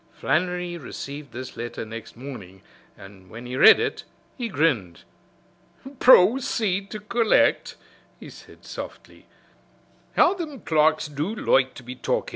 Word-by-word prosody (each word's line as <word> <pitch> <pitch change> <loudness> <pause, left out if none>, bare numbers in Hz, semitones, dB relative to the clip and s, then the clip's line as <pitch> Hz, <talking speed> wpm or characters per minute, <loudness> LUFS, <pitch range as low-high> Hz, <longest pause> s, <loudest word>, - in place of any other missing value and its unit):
Flannery 180 -1 -1
received 140 0 -8
this 130 +1 -8
letter 120 -1 -6
next 115 +1 -10
morning, 105 -8 -10 0.3
and 95 -1 -15
when 115 +5 -10
he 125 +1 -6
read - - +8
it - - -3 0.3
he 240 -3 -4
grinned. 125 - -1 1.0
"Proceed 205 -4 +4
to 215 - -6
collect," 235 +6 +1 0.4
he - - -11
said - - -16
softly. - - -10 0.9
"How 355 - +5
thim 310 - -7
clerks 155 -1 +2
do 150 +9 -4
loike 130 - +1
to - - -11
be 125 +1 -7
talkin'! 130 - -2
150 Hz, 130 wpm, -24 LUFS, -, 1.0 s, read